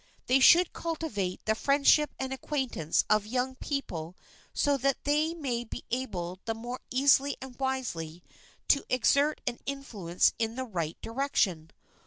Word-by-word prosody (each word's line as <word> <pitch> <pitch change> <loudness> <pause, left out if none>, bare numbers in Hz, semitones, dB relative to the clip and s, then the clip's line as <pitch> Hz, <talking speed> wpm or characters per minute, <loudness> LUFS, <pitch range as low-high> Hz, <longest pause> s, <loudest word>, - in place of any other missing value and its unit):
They 255 +2 +4
should 345 +6 +6
cultivate 265 - -3
the 220 - +3
friendship 280 +5 +3
and 265 0 -3
acquaintance 265 - -1
of 215 0 +2
young 255 +3 -1
people 180 - -4 0.3
so 285 -1 +2
that 275 +1 0
they 305 +3 +1
may 255 -7 -2
be 230 - -8
able 185 -8 -3
the 225 -1 -2
more 240 +3 -6
easily 275 +2 +3
and 260 -1 -9
wisely 180 -12 -3 0.5
to 280 - +4
exert 280 +4 +2
an 245 -1 -3
influence 215 -11 0
in 225 0 -1
the 260 0 -3
right 170 -8 -3
direction. 225 - 0
255 Hz, 145 wpm, -29 LUFS, 205-280 Hz, 0.5 s, should